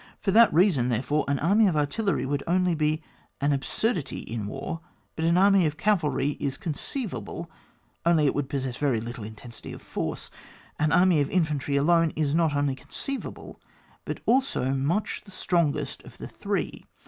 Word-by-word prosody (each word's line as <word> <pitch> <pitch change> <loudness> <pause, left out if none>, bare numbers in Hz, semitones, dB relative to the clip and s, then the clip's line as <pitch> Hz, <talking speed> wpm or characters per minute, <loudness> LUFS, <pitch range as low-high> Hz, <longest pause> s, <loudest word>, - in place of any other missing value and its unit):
For 195 - 0
that 230 +3 +7
reasoD, 160 -8 +3
therefore, 135 +6 0
an 140 0 +1
army 200 +9 +4
of 175 - +1
artilleiy 145 - 0
only 180 +1 +2
would - - -2
be 155 +1 +1 0.4
an 145 +1 +2
absurdity 165 - -1
in 110 -3 -5
war, 135 +8 -5 0.3
but 160 - -1
an 170 +1 +3
army 195 -2 +5
of 150 0 -4
cavalry 160 -7 +1
is 135 -2 -2
conceivable, 170 - -5 0.5
only 165 -3 +4
it 140 - +3
would 145 -2 -2
possess 130 -3 -2
very 135 -6 +1
little 120 0 -6
intensity 110 +2 -8
of - - -10
force. - - -4 0.5
An 155 0 +2
army 175 -3 +5
of 140 - 0
infantry 150 -5 0
alone 165 +3 +3
is 150 -2 0
not 160 -3 +2
only 145 -1 +1
conceivable 270 - -6 0.4
but - - -5
also 250 - +2
much 150 +10 0
the 205 - -16
strong 170 -5 +1
est - - -5
of - - -14
the - - -7
three. - - -3
155 Hz, 170 wpm, -26 LUFS, 140-180 Hz, 0.5 s, that